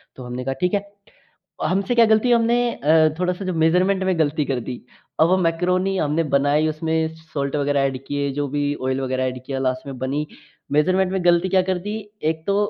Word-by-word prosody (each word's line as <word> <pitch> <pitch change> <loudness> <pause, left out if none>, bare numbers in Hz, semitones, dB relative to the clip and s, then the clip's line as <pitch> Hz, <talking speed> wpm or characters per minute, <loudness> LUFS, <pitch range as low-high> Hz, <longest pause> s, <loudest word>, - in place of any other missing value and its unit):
तो 130 - -9
हमने 125 +1 -5
कहा 135 - -1
ठीक 180 +1 +1
है। 200 - +2 0.9
हमसे 195 +5 0
क्या 235 -1 +6
गलती 220 +3 +3
हमने 235 0 +3 0.2
अ, 155 +2 +4
थोड़ा-सा 180 +1 -1
जो 185 -1 -2
मेज़रमेंट 180 +4 +2
में 185 -2 0
गलती 150 -1 +1
कर 135 -3 -2
दी 125 +1 -6 0.4
और 160 - +6
वो 185 - +4
मैकरोनी 180 +2 +1
हमने 150 +1 +1
बनाई 145 +3 +3
उसमें 160 +1 -1
साल्ट 145 -3 -4
वग़ैरह 145 -1 +1
एड 135 -1 -1
किये 145 0 -1
जो 145 - 0
भी 145 +1 -1
ऑइल 130 +1 -1
वग़ैरह 130 -1 -1
एड 130 -1 -4
किया 135 -1 -3
लास्ट 130 0 -2
में 135 -2 -7
बनी 135 +4 -2 0.5
मेज़रमेंट 185 +5 +2
में 190 -2 -2
गलती 175 +1 +4
क्या 185 0 +3
कर 185 0 -1
दी 205 +4 -5 0.3
एक 160 0 -5
तो 200 - +1
160 Hz, 210 wpm, -22 LUFS, 140-185 Hz, 0.9 s, क्या